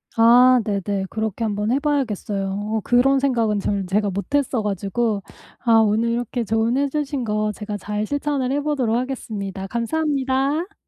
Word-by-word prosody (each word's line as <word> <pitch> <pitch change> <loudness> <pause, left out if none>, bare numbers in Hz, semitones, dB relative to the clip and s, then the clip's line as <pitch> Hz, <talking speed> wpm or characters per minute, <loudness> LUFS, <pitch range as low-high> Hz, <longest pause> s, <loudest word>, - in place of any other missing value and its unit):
아 245 +2 +6
네네. 200 -1 -2
그렇게 220 0 -3
한번 210 +1 -1
해 270 - +2
봐야겠어요. 230 -9 -1
어 210 +2 -2
그런 265 +3 +3
생각은 230 -6 +1
저는 200 -1 -2
제가 200 +1 +1
못했어 250 +4 -1
가지고 205 +1 -1 0.4
아 235 -3 +2
오늘 225 +1 +3
이렇게 240 0 -2
조언해 230 +6 +1
주신 285 -2 -2
거 215 -1 0
제가 210 -1 -5
잘 210 +2 -3
실천을 285 -1 -1
해 285 +1 0
보도록 265 -7 0
하겠습니다. 215 -7 -4
감사합니다. 275 - -1
230 Hz, 340 characters per minute, -22 LUFS, 210-270 Hz, 0.4 s, 아